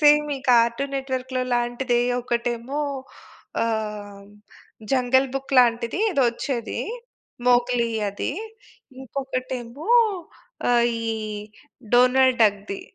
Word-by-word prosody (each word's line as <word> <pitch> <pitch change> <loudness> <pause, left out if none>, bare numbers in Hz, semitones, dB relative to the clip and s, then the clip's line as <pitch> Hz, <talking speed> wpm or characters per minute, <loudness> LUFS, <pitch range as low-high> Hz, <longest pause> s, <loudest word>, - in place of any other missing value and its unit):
Same 295 0 +6
ఈ - - -7
'cartoon 240 +3 +3
net 270 0 -4
వర్క్‌'లో 255 0 -2
లాంటిదే. 240 +1 0 0.2
ఒకటేమో 240 +3 -2 0.8
ఆహ్, 210 -3 -3 0.7
'జంగల్ 260 +1 +3
బుక్' 270 0 -3
లాంటిది 235 - +3
ఏదొ 280 -8 +2
ఒచ్చేది. 235 -1 -4 0.7
మోగ్లీ 245 -1 +3 0.2
అది. 200 +6 -3 0.7
ఇంకొకటేమో 260 - -5 0.8
ఆహ్, 235 -1 +4 0.2
ఈ 230 - -3 0.9
డోనాల్డ్ 255 0 +5
డక్ 205 -2 +3
ది. 200 - -4
245 Hz, 95 wpm, -23 LUFS, 235-265 Hz, 0.9 s, Same